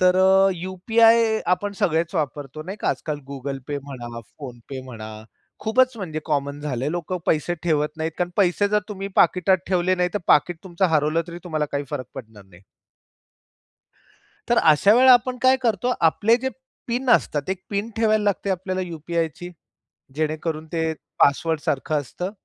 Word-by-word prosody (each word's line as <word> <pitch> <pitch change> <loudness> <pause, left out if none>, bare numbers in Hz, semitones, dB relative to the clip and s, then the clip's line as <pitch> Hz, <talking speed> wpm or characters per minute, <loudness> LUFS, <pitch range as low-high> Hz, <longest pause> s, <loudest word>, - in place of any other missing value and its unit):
तर 180 0 +4
अ, 190 +1 +5
यू-पी-आय 220 +5 +3
आपण 205 +3 -5
सगळेच 165 +2 +1
वापरतो, 145 -1 -3
नाही 190 +5 -7
का. - - 0
आजकाल 150 -2 -2
Google 135 0 -5
Pay 145 - -1
म्हणा, 120 -4 -8 0.2
PhonePe 130 0 -8
म्हणा. 110 -4 -8 0.5
खूपच 255 +3 +2
म्हणजे 165 -7 -5
कॉमन 140 -1 -2
झालं 135 -4 -3
आहे 150 - -1
लोकं 175 +1 -3
पैसे 160 +2 +1
ठेवत 150 -3 +1
नाहीत 160 0 -3
कारण 175 0 -1
पैसे 200 +1 +2
जर 210 - +2
तुम्ही 195 -1 -5
पाकिटात 180 +2 +4
ठेवले 185 0 +2
नाही. 180 -1 +1
तर 205 - +1
पाकीट 160 +4 +3
तुमचं 185 0 -1
हरवलं 155 +2 +2
तरी 170 0 -7
तुम्हाला 155 -4 -1
काही 140 0 -1
फरक 130 - -4
पडणार 110 -4 -11
नाही. 95 0 -19 1.9
तर - - +3
अशा 160 +6 +5
वेळेला 255 +1 +7
आपण 250 +1 +3
काय 260 0 +5
करतो. 235 +1 +1
आपले 205 +8 +3
जे 260 +2 -2 0.4
पिन 245 +2 -1
असतात. 145 - +2
एक 190 -1 -3
पिन 205 +2 -2
ठेवायला 215 -1 +2
लागते 200 0 0
आपल्याला 185 0 -2
यू-पी-आयची. 170 0 -4 0.6
जेणेकरून 155 +1 -2
ते 160 -1 0 0.3
पासवर्डसारखं 150 0 +1
असतं. 180 +7 -6
170 Hz, 160 wpm, -23 LUFS, 150-200 Hz, 1.9 s, वेळेला